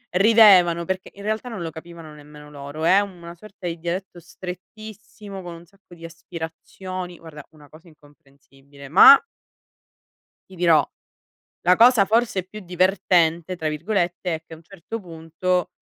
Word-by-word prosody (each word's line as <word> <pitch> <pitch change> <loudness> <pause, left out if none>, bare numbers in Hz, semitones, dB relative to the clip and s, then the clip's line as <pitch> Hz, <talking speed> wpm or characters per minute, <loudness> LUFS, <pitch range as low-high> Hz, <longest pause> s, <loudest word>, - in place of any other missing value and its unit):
ridevano 190 -5 +5
perché 190 +1 -4
in 200 - -12
realtà 220 +3 -3
non 215 -7 -6
lo 165 - -5
capivano 165 -1 -12
nemmeno 150 0 -15
loro. 145 +2 -8
È 185 +4 +5
una 175 -4 -7
sorta 195 +2 -14
di 170 -1 -4
dialetto 175 +2 -5
strettissimo 200 +3 -11
con 175 -2 -9
un 170 +1 -14
sacco 190 0 -20
di 165 - -12
aspirazioni. 175 +2 -8
Guarda, 155 -3 -12
una 150 -2 -19
cosa 155 +5 -18
incomprensibile, 140 -2 -19
ma 195 - +9 1.3
ti - - -13
dirò, 165 -4 +3 0.8
la 180 +1 +4
cosa 235 -2 +6
forse 220 -3 0
più 210 +3 -11
"divertente" 180 -2 +1
tra 160 -2 -3
virgolette 175 +2 -2
è 160 - -7
che 165 - -18
a - - -13
un 160 - -19
certo 195 +5 -9
punto 170 +1 -3
175 Hz, 150 wpm, -22 LUFS, 160-190 Hz, 1.3 s, ma